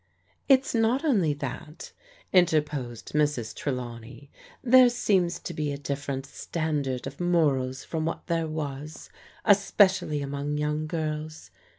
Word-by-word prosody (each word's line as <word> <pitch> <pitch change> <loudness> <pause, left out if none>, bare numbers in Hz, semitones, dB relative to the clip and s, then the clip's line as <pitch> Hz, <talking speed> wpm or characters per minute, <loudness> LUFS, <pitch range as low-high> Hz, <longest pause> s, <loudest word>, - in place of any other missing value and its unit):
"It's 270 -1 +4
not 235 +6 +2
only 190 - +2
that/' 145 +3 -7 0.4
interposed 150 -9 +1
Mrs. 145 -7 0
Trelawney, 125 0 -6 0.2
" - - -25
there 255 -1 +9
seems 190 -7 +1
to 175 - -6
be 150 -2 -2
a 140 - -4
different 140 -1 -4
standard 145 -3 -3
of 135 +1 -7
morals 145 -7 +1
from 160 -1 -3
what 165 - -4
there 165 -2 0
was, 150 -1 -6 0.3
especially 190 -7 +3
among 140 +1 -3
young 150 +1 -1
girls. 155 -1 -4
150 Hz, 125 wpm, -27 LUFS, 140-170 Hz, 0.4 s, there